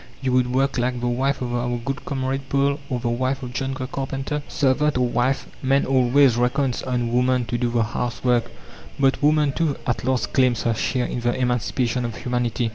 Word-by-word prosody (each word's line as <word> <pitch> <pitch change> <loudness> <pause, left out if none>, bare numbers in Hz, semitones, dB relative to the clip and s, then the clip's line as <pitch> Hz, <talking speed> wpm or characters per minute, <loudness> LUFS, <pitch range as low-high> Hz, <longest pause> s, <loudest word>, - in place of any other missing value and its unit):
You 130 -1 -1
would 125 -1 +2
work 135 0 +1
like 125 0 0
the 120 - -2
wife 130 +3 0
of 120 -1 -3
our 120 0 -1
good 130 +2 -5
comrade 135 0 -3
Paul 140 +1 +1
or 125 -3 -1
the 120 0 -2
wife 130 +3 -1
of 125 -1 -6
John 135 +2 -2
the 130 - -4
carpenter?" 135 +2 -3
Servant 145 0 +1
or 125 -1 +2
wife, 125 +3 0 0.2
man 135 +1 +2
always 130 -1 +4
reckons 125 +1 +1
on 120 -2 -2
woman 125 0 +2
to 120 +1 -2
do 120 -1 +1
the 120 -1 +1
house 120 +2 -3
work. 120 -2 +2 0.5
But 135 -1 +2
woman, 150 -1 +3
too, 155 -1 0
at 125 - -1
last 130 0 -1
claims 125 -5 +2
her 115 - +2
share 125 +3 -1
in - - -3
the 120 0 0
emancipation 125 0 0
of 115 -2 -4
humanity. 120 -1 -1
125 Hz, 205 wpm, -23 LUFS, 120-135 Hz, 0.5 s, always